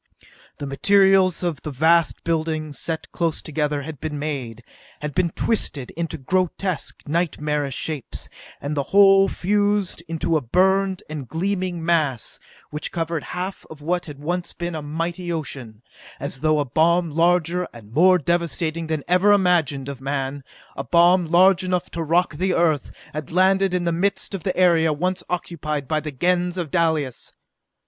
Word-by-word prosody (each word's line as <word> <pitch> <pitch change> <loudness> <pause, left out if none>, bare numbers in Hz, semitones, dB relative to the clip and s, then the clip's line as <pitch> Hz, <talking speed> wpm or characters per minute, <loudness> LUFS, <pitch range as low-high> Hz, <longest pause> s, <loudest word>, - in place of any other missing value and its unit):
The 145 - -5
materials 190 +5 +3
of 170 -4 -1
which - - -21
the - - -4
vast 160 +4 +2
buildings, 155 -2 -2
set 165 -1 -4
close 165 -2 -1
together, 150 -2 -2
had 155 -2 -8
been 155 -2 -3
made, 130 -6 -4 0.4
had 150 -1 -4
been 175 +3 +1
twisted 155 - -2
into 165 0 -4
grotesque, 185 +3 -2
nightmarish 150 -3 -1
shapes, 155 -5 -5 0.3
and 145 +2 -3
the 140 - +1
whole 195 0 +6
fused 205 -1 0
into 165 0 -1
a - - -2
burned 190 +7 +2
and 150 -4 -6
gleaming 180 0 -2
mass 155 -8 0 0.3
which 150 0 -4
covered 165 -2 -2
half 185 +2 -4
of 155 -2 -11
what 175 +3 -1
had 145 -2 -8
once 175 +5 -3
been 175 0 -4
a 155 - -4
mighty 165 +4 -3
ocean 125 -8 -6 0.4
as 135 - -5
though 155 +1 +2
a 145 - +1
bomb 165 +5 +2
larger 175 +2 +2
and 115 -2 -14
more 185 +6 +6
devastating 170 0 -1
than 155 -3 -2
ever 185 +3 +4
imagined 170 -8 +2
of 140 -2 -7
man, 135 0 -3 0.3
a 135 - -4
bomb 175 +5 +4
large 185 +3 +5
enough 180 -1 -1
to 170 - -4
rock 165 +2 +2
the 185 +2 +1
Earth, 160 -5 +1 0.2
had 155 -1 -5
landed 190 +2 +3
in 180 -1 0
the 170 - +1
midst 190 +4 -1
of 195 - -3
the 185 - -2
area 170 -3 +4
once 180 +4 -1
occupied 150 -5 -3
by 155 +2 +1
the 150 0 -5
Gens 180 +5 0
of 170 -5 -3
Dalis! 160 -7 0
165 Hz, 165 wpm, -22 LUFS, 150-180 Hz, 0.4 s, whole